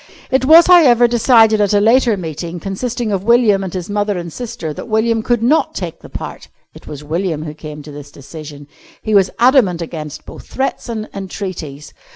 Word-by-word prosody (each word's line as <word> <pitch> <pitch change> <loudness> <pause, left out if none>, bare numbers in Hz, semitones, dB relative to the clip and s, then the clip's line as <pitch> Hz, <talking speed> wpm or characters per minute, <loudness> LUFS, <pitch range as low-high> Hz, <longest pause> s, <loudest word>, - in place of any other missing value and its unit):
It 260 0 +1
was, 325 +4 +8
however, 260 -10 +6
decided 225 -2 +4
at 205 0 +1
a - - +4
later 230 +1 +3
meeting, 170 0 -6
consisting 225 +5 -4
of 195 -2 -2
William 225 -3 +3
and 190 - -5
his 180 -2 -5
mother 205 -1 -1
and 170 -2 -7
sister, 230 -10 -6
that - - -9
William 225 +1 +1
could 240 0 -1
not 295 +7 +1
take - - -6
the - - -14
part. - - -8 0.3
It - - -16
was 150 0 -8
William 160 0 -3
who 150 -1 -7
came 150 -1 -10
to 150 - -11
this 145 0 -10
decision. 145 0 -11 0.4
He 215 - -2
was 195 -2 +4
adamant 235 -8 +3
against 155 -3 -7
both - - -12
threats 265 -2 -3
and 220 -2 -4
entreaties. 180 -7 -7
200 Hz, 195 wpm, -16 LUFS, 165-235 Hz, 0.4 s, was